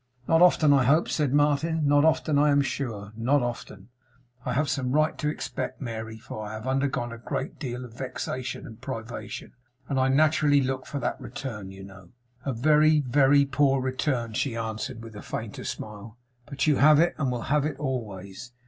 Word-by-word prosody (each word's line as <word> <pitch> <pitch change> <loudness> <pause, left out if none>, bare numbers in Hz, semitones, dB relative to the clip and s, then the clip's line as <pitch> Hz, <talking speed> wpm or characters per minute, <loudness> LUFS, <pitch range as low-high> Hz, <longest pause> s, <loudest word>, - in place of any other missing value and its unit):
'Not 165 +1 +4
often, 160 -4 +6
I 135 -3 +4
hope,' 155 +6 +3
said 150 -4 0
Martin. 150 +2 +2
'Not 145 0 +5
often, 155 -2 +2
I 150 +1 +4
am 145 0 +4
sure. 110 -7 -4
Not 125 +4 +2
often, 115 -4 -6 0.5
I 125 - -2
have 145 +4 +1
some 130 -1 -1
right 155 +1 +2
to 150 - 0
expect, 150 - -4
Mary; 110 -3 -5
for 110 -1 -8
I 105 0 -6
have 110 +1 -7
undergone 130 -2 -1
a 115 - -8
great 135 +4 -4
deal 125 -3 -4
of 120 - -13
vexation 130 +1 -4
and 115 -5 -11
privation, 115 +1 -6 0.3
and 135 -2 0
I 130 - +3
naturally 150 +1 +4
look 130 0 -2
for 145 - -4
that - - -2
return, 115 -4 -6
you 95 0 -10
know.' 95 -2 -13 0.4
'A 135 - -1
very, 150 +4 +4
very 140 +1 +4
poor 135 -1 +2
return,' 130 -3 -1
she 120 +2 -1
answered 110 0 -4
with 115 -2 -10
a 105 - -7
fainter - - -6
smile. 105 +1 -7 0.3
'But 140 -2 -2
you 150 -3 +3
have 150 +1 +6
it, 170 +1 +3
and 135 -4 0
will 120 -2 -3
have 150 -2 +3
it 150 -3 -3
always. 115 -5 -5
130 Hz, 195 wpm, -26 LUFS, 115-145 Hz, 0.5 s, often